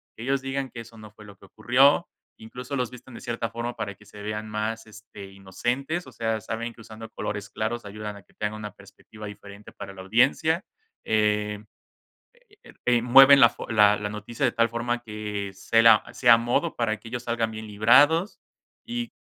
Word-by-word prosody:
que 110 - -12
ellos 135 +1 0
digan 135 0 -3
que 115 - -8
eso 115 0 -14
no 105 -1 -11
fue 105 0 -16
lo 100 -1 -14
que - - -17
ocurrió, 130 - +3 0.3
incluso 125 +5 -8
los 125 -2 -2
visten 125 0 -13
de - - -10
cierta 115 -1 -3
forma 120 +1 -5
para 100 -1 -5
que 105 - -20
se 105 0 -13
vean 105 +1 -4
más, 110 +1 -3
este, 105 -1 -12
inocentes, 120 - -3
o - - -12
sea, 115 -1 -2
saben 115 +2 -5
que - - -15
usando 110 0 -11
colores 105 0 -5
claros 115 +2 -3
ayudan 105 0 -7
a 100 - -12
que - - -30
tengan 105 0 -4
una 105 -1 -7
perspectiva 100 +2 -14
diferente 100 0 -11
para - - -9
la 95 - -9
audiencia. 135 - +2 0.4
Eh, 105 -1 0 1.4
mueven 135 +3 +8
la 120 - +9
fo - - -9
la 105 -2 +5
la 105 0 -4
noticia 105 +5 -6
de 120 - +2
tal 115 0 +2
forma 120 +1 -2
que 105 -3 -5
sea 115 +3 +5 0.3
a - - +6
modo 120 +8 -1
para 110 -2 -1
que 115 - -14
ellos 120 0 -5
salgan 115 -2 -1
bien 110 0 -8
librados 140 - +4 0.5
y 240 -1 -4
110 Hz, 190 wpm, -25 LUFS, 105-120 Hz, 1.4 s, la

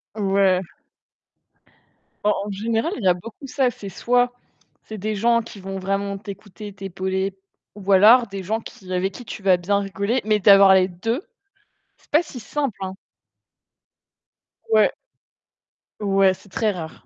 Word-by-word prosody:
Ouais. 195 -3 +2 1.6
Bah, 210 0 +3
en 205 - -5
général, 225 - -1
il 215 - -7
y - - +2
a 180 - +6
beaucoup 230 - -10
ça, 260 -1 +1
c'est 205 - -10
soit, 245 +5 +1 0.5
c'est 220 - -8
des 215 +2 -3
gens 235 +3 +2
qui 220 - -11
vont 195 0 -6
vraiment 195 +1 -2
t'écouter, 200 0 -9
t'épauler 190 0 -3 0.4
ou 205 - -11
alors, 210 +5 +6
des 195 -1 -6
gens 220 +5 -1
qui 185 -4 -11
avec 190 +2 -1
qui 245 - -9
tu 210 - -8
vas 190 -2 +5
bien 200 +3 0
rigoler, 200 +5 -1
mais 215 0 +2
d'avoir 195 -1 +7
les 185 -1 +4
2, 225 - -3 0.8
c'est - - -30
pas 305 - +5
si 270 -6 -9
simple, 270 +1 -3
hein? 190 0 -4 1.7
Ouais. 220 -1 +4 1.1
Ouais, 195 -2 +3
c'est 190 - -16
très 215 +3 0
rare. 165 -4 -8
200 Hz, 155 wpm, -22 LUFS, 190-220 Hz, 1.7 s, d'avoir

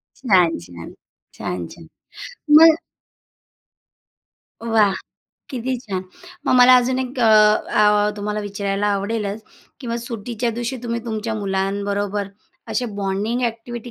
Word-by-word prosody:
छान, 185 - +2
छान! 85 -1 -11 0.4
छान, 90 -2 -5
छान! 165 -1 -13 0.6
मग 320 +1 +8 1.8
वाह! 220 -4 +2 0.6
किती 255 0 -2
छान! 190 -6 -4 0.4
मग - - +3
मला 250 0 +8
अजून 255 +1 +1
एक 260 0 -4
अ, - - +3
अ, 210 -1 +4
तुम्हाला 210 +1 -3
विचारायला 200 0 -2
आवडेलच 205 +1 -2 0.4
की 250 - -8
मग 235 0 -2
सुट्टीच्या 235 +1 -3
दिवशी 240 +3 -4
तुम्ही 235 -1 -3
तुमच्या 220 0 -3
मुलांबरोबर 200 0 -2 0.4
असे 250 - -1 0.2
बॉन्डिंग 205 +6 -1
अ‍ॅक्टिव्हिटी 235 +1 -4
215 Hz, 115 wpm, -21 LUFS, 200-240 Hz, 1.8 s, मग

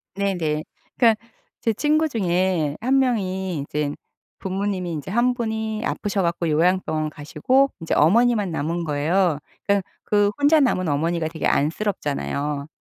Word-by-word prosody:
네네. 175 -6 -1 0.3
그러니까는 230 -3 +5 0.5
제 225 - +1
친구 305 +6 +2
중에 180 - 0
1 265 +3 +3
명이 190 - -1
이젠 145 +1 -3 0.4
부모님이 190 -2 -2
인제 150 +2 -5
1 240 +4 +3
분이 220 -2 -3
아프셔 205 -2 -1
갖고 170 -1 -1
요양병원 160 -1 +1
가시고 255 - +1
인제 165 - -3
어머니만 210 +4 +3
남은 165 +2 -2
거예요. 160 +2 +1 0.3
그러니깐 200 -1 +3 0.2
그 205 -1 +2
혼자 290 +2 +5
남은 185 -10 +2
어머니가 160 +3 0
되게 160 0 -4
안쓰럽잖아요. 145 - -1
185 Hz, 320 characters per minute, -23 LUFS, 155-220 Hz, 0.5 s, 그러니까는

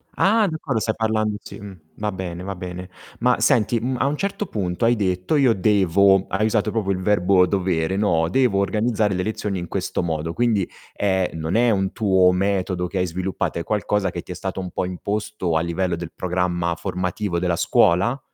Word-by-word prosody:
Ah, 215 +1 +3
d'accordo, 155 -7 -2
stai 110 0 -1
parlando 110 -1 0
sì, - - -10
uhm, 100 -2 -10 0.2
va 105 0 -2
bene, 90 -2 -6
va 100 0 -5
bene. 90 0 -7 0.3
Ma 125 +1 +2
senti, 115 -3 +3
mhmm, 125 +3 -2
a 130 - +2
un 145 +2 -1
certo 200 +2 -2
punto 90 -1 -3
hai 120 +1 +4
detto: 90 - 0
"Io 135 -5 +4
devo", 95 -1 +3
hai 105 +3 0
usato 105 -1 0
proprio 105 -3 -1
il 95 - 0
verbo 95 -1 +3
dovere, 90 -2 0
no: 85 -6 +2
"Devo 120 -2 +2
organizzare 105 0 +1
le 90 0 -1
lezioni 105 -2 -3
in 85 - -6
questo - - -2
modo", 80 -1 -2
quindi, 110 -5 +1 0.3
ehm, 95 -4 0
non 80 +4 -2
è 120 +1 +4
un 95 -3 +1
tuo 95 -4 +4
metodo 95 -1 0
che 95 - -5
hai 90 - +1
sviluppato, 90 0 -3
è - - -3
qualcosa 105 0 0
che 85 - -5
ti - - -11
è - - -5
stato 95 +1 -4
un 90 -1 -5
po' 95 - -2
imposto 100 -1 -3
a 80 - +3
livello 85 +1 -1
del 85 -1 -7
programma 90 -1 -1
formativo 90 +1 -2
della 90 -1 0
scuola? 90 +8 +3
95 Hz, 200 wpm, -22 LUFS, 90-110 Hz, 0.3 s, hai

